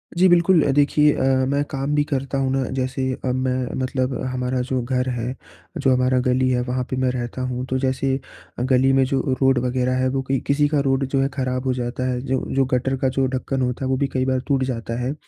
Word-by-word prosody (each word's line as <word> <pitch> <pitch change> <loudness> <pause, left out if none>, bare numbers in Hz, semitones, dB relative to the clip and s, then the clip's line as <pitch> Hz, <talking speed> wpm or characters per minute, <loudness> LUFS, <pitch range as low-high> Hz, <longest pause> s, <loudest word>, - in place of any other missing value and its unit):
जी 185 +2 +5
बिल्कुल। 175 -1 +5
अ, - - +1
देखिए, 145 +1 +4
अ, - - -2 0.3
मैं 140 +1 +1
काम 140 +1 -1
भी 145 - +3
करता 135 0 -1
हूँ 135 -1 0
ना, 135 0 +1
जैसे 130 0 -1
अब 125 0 0
मैं 130 -1 -1
मतलब 130 0 -1 0.2
हमारा 125 0 -1
जो 130 -1 0
घर 125 +1 -1
है 125 +1 -3 0.4
जो 130 -1 +3
हमारा 125 0 +2
गली 130 +1 +2
है 125 -1 +1
वहाँ 125 0 -1
पे 130 - -2
मैं 130 -1 +1
रहता 125 0 -4
हूँ। 125 0 -3
तो 130 - 0
जैसे 135 0 0 0.4
गली 130 +1 +3
में 135 0 +4
जो 135 0 0 0.2
रोड 135 -1 +4
वग़ैरह 130 0 0
है 130 0 +1
वो 135 0 -1
कई 135 -1 +1
किसी 145 +1 +3
का 150 -1 +1
रोड 135 0 +2
जो 135 0 0
है 135 - +2
ख़राब 130 -1 -2
हो 130 - +1
जाता 125 +1 -3
है 125 - -2
जो 130 -1 -1 0.2
जो 135 -1 +3
गटर 130 +2 +1
का 130 0 +1
जो 135 0 0
ढक्कन 130 +1 -2
होता 125 +1 -1
है - - -2
वो 130 - +1
भी 140 - +1
कई 130 0 +1
बार 130 -1 +1
टूट 135 -2 +2
जाता 115 -2 -3
है। 130 +4 -1
130 Hz, 245 wpm, -22 LUFS, 125-135 Hz, 0.4 s, जी